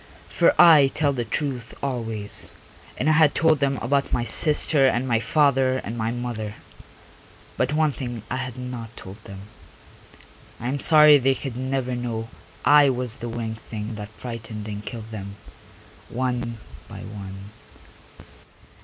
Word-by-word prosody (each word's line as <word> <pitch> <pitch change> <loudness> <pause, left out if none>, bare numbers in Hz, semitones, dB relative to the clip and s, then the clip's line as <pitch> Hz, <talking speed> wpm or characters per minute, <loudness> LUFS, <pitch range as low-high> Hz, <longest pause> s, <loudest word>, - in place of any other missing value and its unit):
For - - +2
I 160 -5 +8
tell 145 +1 0
the 120 -3 -2
truth 125 0 -3
always, 115 -6 -4 0.4
and - - -1
I - - +5
had 155 -1 +4
told 160 -2 +3
them 135 -1 +1
about 140 +3 0
my 120 - +1
sister 150 +1 +2
and 130 0 0
my 115 -2 +2
father 135 -2 +2
and 115 -2 -5
my 110 -1 -1
mother. 115 -3 -4 1.0
But 135 - 0
one 155 -1 +3
thing 120 -5 -6
I - - -3
had 130 -1 -5
not 125 -3 -7
told 100 +3 -11
them. 100 -1 -9 1.2
I 120 - -3
am 140 +2 -2
sorry 150 -1 +7
they 135 +1 +2
could 130 -2 -6
never 130 0 -2
know 115 -2 -4 0.4
I 145 -1 +7
was 125 -2 -3
the 120 - -6
winged 115 -1 -4
thing 110 0 -6
that 105 -1 -7
frightened 110 -2 -7
and 105 -1 -6
killed 110 0 -8
them, 100 -2 -7 0.7
one 125 -2 -2 0.3
by - - -9
one.... 100 -1 -9
125 Hz, 155 wpm, -24 LUFS, 110-135 Hz, 1.2 s, I